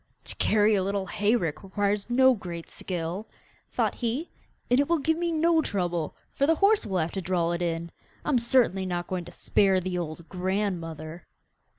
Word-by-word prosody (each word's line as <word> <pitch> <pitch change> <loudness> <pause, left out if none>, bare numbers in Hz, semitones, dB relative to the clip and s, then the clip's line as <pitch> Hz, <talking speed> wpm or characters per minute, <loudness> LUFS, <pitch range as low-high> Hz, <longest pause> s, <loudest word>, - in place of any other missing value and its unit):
'To - - -2
carry 215 0 +3
a 200 - +3
little 195 0 -1
hay 210 +4 +1
rick 160 -9 -2
requires 200 +2 -1
no 260 +2 +6
great 175 -6 -6
skill,' 180 +3 -4 0.4
thought - - +1
he, 245 +8 -3 0.4
'and 250 +2 +3
it 285 - +2
will 340 - +4
give 320 +2 +1
me 340 +1 -1
no 325 0 +3
trouble, 175 - -2 0.2
for 280 - +1
the 325 - +4
horse 400 - +3
will 190 -2 -1
have 160 -1 0
to 195 - -3
draw 175 -1 0
it 170 0 -2
in. 170 -1 -2 0.3
I - - -1
am 265 -5 +4
certainly 235 -6 +2
not 175 -1 -2
going 180 -2 -4
to 175 - -10
spare 195 -2 +2
the 180 0 -2
old 165 0 -6
grandmother. 180 -4 -3
190 Hz, 195 wpm, -27 LUFS, 175-240 Hz, 0.4 s, no